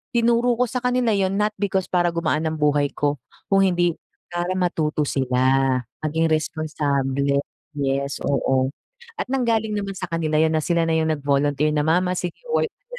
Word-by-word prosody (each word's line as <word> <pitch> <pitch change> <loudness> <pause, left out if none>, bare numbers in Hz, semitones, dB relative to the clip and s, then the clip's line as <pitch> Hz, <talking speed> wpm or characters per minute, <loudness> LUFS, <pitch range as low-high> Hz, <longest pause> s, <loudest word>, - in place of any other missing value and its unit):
tinuro 235 +1 +3
ko 245 - +2
sa 250 - -2
kanila 250 -2 +1
yun 195 -1 +1
not 210 +1 +1
because 190 -2 -1
para 175 -1 +3
gumaan 160 -1 0
ng 160 - -2
buhay 145 -1 +2
ko, 145 -1 0 0.3
kung 195 0 +5
hindi 175 -2 +1 0.3
para 175 +1 -2
matuto 165 -5 0
sila, 130 -3 0 0.6
maging 160 +2 +1
responsable. 140 -3 0 0.3
Yes, 140 -1 -2
oo. 130 -1 +1 0.5
At - - -2
nanggaling 230 -4 0
naman 200 -2 -3
sa 180 - -3
kanila 160 -2 -1
yun 160 0 +3
na 155 - +1
sila 170 +1 +1
na 165 - 0
yung 160 0 +1
nag-volunteer 145 0 +1
na, 150 - +2
"Mama, 180 +4 +2
sige 180 -1 -4 0.2
work 470 - +2
ka - - -53
160 Hz, 170 wpm, -22 LUFS, 145-195 Hz, 0.6 s, kung